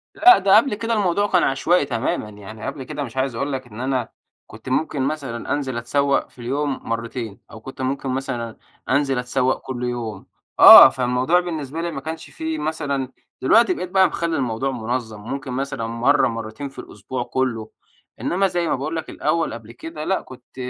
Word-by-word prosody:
لأ، 370 Hz, -, +8 dB
ده 195 Hz, +1 st, +5 dB
قبل 230 Hz, 0 st, +2 dB
كده 230 Hz, +2 st, -2 dB
الموضوع 205 Hz, -1 st, +1 dB
كان 180 Hz, -4 st, +3 dB
عشوائي 145 Hz, +4 st, +2 dB
تمامًا 115 Hz, -4 st, -2 dB
يعني، 105 Hz, +1 st, -10 dB
قبل 135 Hz, -, -5 dB
كده 145 Hz, +2 st, -5 dB
مش 130 Hz, -1 st, -9 dB
عايز 130 Hz, -2 st, 0 dB
أقول 140 Hz, +4 st, -2 dB
لك 130 Hz, -1 st, -5 dB
إن 110 Hz, -1 st, -11 dB
أنا 130 Hz, -3 st, -1 dB, 0.4 s
كنت 110 Hz, +3 st, -10 dB
ممكن 145 Hz, +1 st, 0 dB
مثلًا 135 Hz, -4 st, -3 dB
أنزل 135 Hz, -4 st, -2 dB
أتسوّق 140 Hz, +4 st, 0 dB
في -, -, -23 dB
اليوم 140 Hz, +3 st, -2 dB
مرتين، 115 Hz, -2 st, -4 dB
أو 110 Hz, -, -11 dB
كنت 130 Hz, +2 st, -9 dB
ممكن 135 Hz, +1 st, -2 dB
مثلًا 120 Hz, -3 st, -4 dB, 0.3 s
أنزل 135 Hz, -1 st, +2 dB
أتسوّق 125 Hz, +1 st, 0 dB
كل 125 Hz, -2 st, -6 dB
يوم. 120 Hz, -5 st, -4 dB, 0.3 s
آه، -, -, +12 dB
فالموضوع 130 Hz, +6 st, +1 dB
بالنسبة 160 Hz, -3 st, -4 dB
لي 170 Hz, -, -3 dB
ما -, -, -6 dB
كانش 160 Hz, 0 st, -7 dB
فيه 160 Hz, 0 st, -4 dB
مثلًا 145 Hz, -4 st, -2 dB, 0.3 s
دلوقتي 230 Hz, -, +4 dB
بقيت 185 Hz, -, -5 dB
بقى 190 Hz, 0 st, +4 dB
مخلّي 170 Hz, 0 st, -2 dB
الموضوع 130 Hz, 0 st, -1 dB
منظَّم، 115 Hz, -3 st, -4 dB
ممكن 135 Hz, +3 st, -5 dB
مثلًا 130 Hz, -3 st, -3 dB
مرة 120 Hz, +5 st, +2 dB
مرتين 115 Hz, +4 st, -5 dB
في 135 Hz, -, -13 dB
الأسبوع 120 Hz, +5 st, -6 dB
كلّه، 120 Hz, -4 st, -2 dB, 0.5 s
إنما 195 Hz, +2 st, +1 dB
زي 175 Hz, -2 st, -1 dB
ما -, -, +1 dB
باقول 150 Hz, +5 st, -4 dB
لك 160 Hz, -, -4 dB
الأول 165 Hz, -1 st, -1 dB
قبل 115 Hz, -1 st, -10 dB
كده 155 Hz, +6 st, -8 dB
لأ، 190 Hz, +4 st, 0 dB
كنت 125 Hz, -1 st, -15 dB
135 Hz, 185 wpm, -22 LUFS, 120-155 Hz, 0.5 s, آه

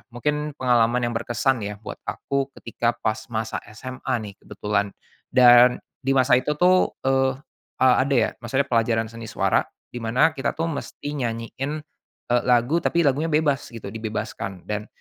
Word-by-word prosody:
mungkin 150 Hz, +4 st, -2 dB
pengalaman 120 Hz, -1 st, +3 dB
yang 120 Hz, -, -5 dB
berkesan 120 Hz, 0 st, 0 dB
ya, 105 Hz, 0 st, -6 dB
buat -, -, -7 dB
aku 140 Hz, 0 st, -2 dB
ketika 115 Hz, +1 st, -1 dB
pas 110 Hz, -1 st, -1 dB
masa 110 Hz, 0 st, -2 dB, 0.2 s
SMA 130 Hz, +4 st, -6 dB, 0.2 s
nih 100 Hz, -, -11 dB
kebetulan. 100 Hz, -1 st, -2 dB, 0.4 s
Dan 125 Hz, -1 st, +7 dB, 0.2 s
di 135 Hz, -, +2 dB
masa 130 Hz, -1 st, +4 dB
itu 130 Hz, +4 st, 0 dB
tuh, 180 Hz, +4 st, +3 dB
eee, 135 Hz, 0 st, +2 dB, 0.5 s
a 130 Hz, 0 st, +5 dB
ada 140 Hz, -, +1 dB
ya 115 Hz, -3 st, +3 dB
maksudnya 135 Hz, +4 st, +1 dB
pelajaran 115 Hz, -1 st, +1 dB
seni 115 Hz, 0 st, -9 dB
suara, -, -, +1 dB, 0.2 s
di 120 Hz, -, -7 dB
mana 125 Hz, +8 st, +3 dB
kita 135 Hz, -, -1 dB
tuh 165 Hz, +1 st, -1 dB
mesti 145 Hz, -1 st, -6 dB
nyanyiin, 120 Hz, +3 st, -3 dB, 0.6 s
eee, 120 Hz, -, +3 dB
lagu, 125 Hz, +6 st, +3 dB
tapi 170 Hz, -1 st, +1 dB
lagunya 145 Hz, +4 st, +2 dB
bebas 150 Hz, -3 st, +1 dB
gitu, 115 Hz, -4 st, -8 dB
dibebaskan 105 Hz, -4 st, -5 dB
dan, 105 Hz, 0 st, -4 dB
125 Hz, 160 wpm, -24 LUFS, 115-135 Hz, 0.6 s, Dan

